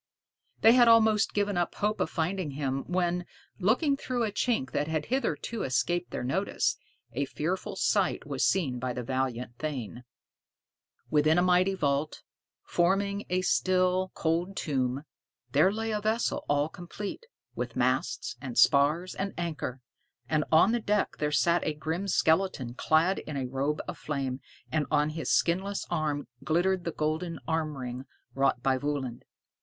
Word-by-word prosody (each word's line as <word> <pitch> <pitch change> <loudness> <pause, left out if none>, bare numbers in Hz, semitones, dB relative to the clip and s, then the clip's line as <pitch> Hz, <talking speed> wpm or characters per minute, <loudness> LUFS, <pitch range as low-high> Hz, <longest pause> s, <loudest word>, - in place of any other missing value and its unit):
They 225 - +8
had 240 0 +6
almost 220 -2 +5
given 205 -2 0
up 175 - -1
hope 210 +1 0
of - - 0
finding 170 -2 -2
him, 135 -2 -2
when, 180 0 0 0.4
looking 255 - +2
through 255 -3 -2
a 215 - 0
chink 210 - 0
that 145 +1 -1
had 155 -1 -1
hitherto 235 -3 -1
escaped 175 +7 0
their - - -4
notice, 180 +11 0 0.4
a 140 +4 0
fearful 175 +8 -3
sight 190 -3 +1
was 140 -2 -2
seen 140 -10 +1
by 125 0 -2
the 125 - -4
valiant 125 -2 -3
thane. 125 -6 -4 1.1
Within 155 +2 +4
a 175 - +4
mighty 185 +1 +3
vault, 145 -2 -1 0.4
forming 200 +3 +1
a 185 +1 +1
still, 185 0 +2
cold 170 +4 -1
tomb, 135 -2 -1 0.5
there 155 +8 +4
lay 225 +1 -2
a 210 -1 -1
vessel 220 +2 0
all 145 +1 +2
complete, 195 - -7 0.3
with - - -4
masts - - 0
and 240 - -6
spars 150 +6 +4
and 195 +1 -4
anchor; 160 -7 -4 0.5
and 155 +1 +1
on 160 +7 +6
the 240 - +1
deck 210 -1 0
there 150 0 0
sat 170 +3 +3
a 155 - -1
grim 160 +6 -3
skeleton 160 -8 +1
clad 160 +8 +2
in 150 -2 -6
a 135 - -1
robe 135 +4 -1
of 180 -3 -6
flame, 135 -3 -3 0.3
and 155 -2 0
on 150 0 +2
his 160 +1 -4
skinless 190 +4 +1
arm 150 -3 -1 0.2
glittered 175 +3 +1
the 170 - -1
golden 160 +3 -2
arm 160 -2 -1
ring 125 0 -5 0.3
wrought 135 -2 +1
by 130 -1 +2
Völund. 135 -4 -3
165 Hz, 160 wpm, -29 LUFS, 145-190 Hz, 1.1 s, They